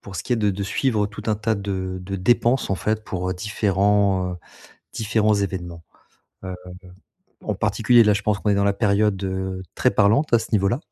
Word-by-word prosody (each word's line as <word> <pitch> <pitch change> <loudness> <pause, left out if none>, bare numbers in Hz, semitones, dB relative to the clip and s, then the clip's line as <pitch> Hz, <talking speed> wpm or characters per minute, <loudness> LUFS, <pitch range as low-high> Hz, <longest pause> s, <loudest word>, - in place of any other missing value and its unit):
pour 95 -1 -9
ce - - -4
qui - - -2
est - - +2
de 105 -2 +1
de 100 +1 -4
suivre 105 +1 0
tout 105 +1 -10
un 110 - +2
tas 110 +1 -1
de 95 -2 -4
de 95 +2 -5
dépenses 120 +6 +2
en 95 - +1
fait 110 +3 -2
pour, 90 -1 -4
heu, 95 - -1
différents, 100 -1 +1
heu, - - -6 0.6
différents 110 -1 +1
événements. 90 -4 -4 0.6
Heu, 95 0 -5 0.9
en - - -2
particulier 120 -1 +3
là 105 -1 +4
je 100 - -1
pense 105 -1 0
qu'on 105 - -1
est - - +2
dans 100 - +2
la 100 - +2
période 95 -3 -1
très - - +3
parlante 110 +10 +2
à - - +8
ce 110 - -7
niveau-là, 105 +3 +1
100 Hz, 205 wpm, -22 LUFS, 95-110 Hz, 0.9 s, à